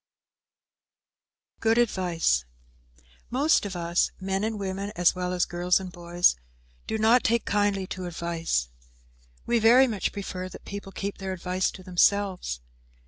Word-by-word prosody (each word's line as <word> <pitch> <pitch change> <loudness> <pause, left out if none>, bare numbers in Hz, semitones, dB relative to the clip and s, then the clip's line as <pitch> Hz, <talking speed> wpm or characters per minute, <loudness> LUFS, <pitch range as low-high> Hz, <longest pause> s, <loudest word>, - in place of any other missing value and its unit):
"_ - - -40
GOOD 225 0 +2
ADVICE 180 - +1 0.8
Most 270 -3 +2
of 190 - -7
us, 170 0 +1
men 195 +1 -2
and 220 -1 -2
women 195 +1 -3
as 175 0 +4
well 180 0 -3
as 180 -1 +1
girls 175 +1 +1
and 185 -1 -7
boys, 175 0 +2 0.5
do 220 - -1
not 225 +3 +4
take 235 0 +1
kindly 205 -1 +1
to 185 -1 -6
advice. 165 - -2 0.8
We 235 -1 +2
very 240 +4 +7
much 215 -7 -2
prefer 185 -2 -5
that - - -12
people 200 -1 -7
keep 200 +1 -5
their 190 -1 -3
advice 185 +1 -1
to 185 - -11
themselves. 185 - +1
190 Hz, 145 wpm, -26 LUFS, 175-205 Hz, 0.8 s, very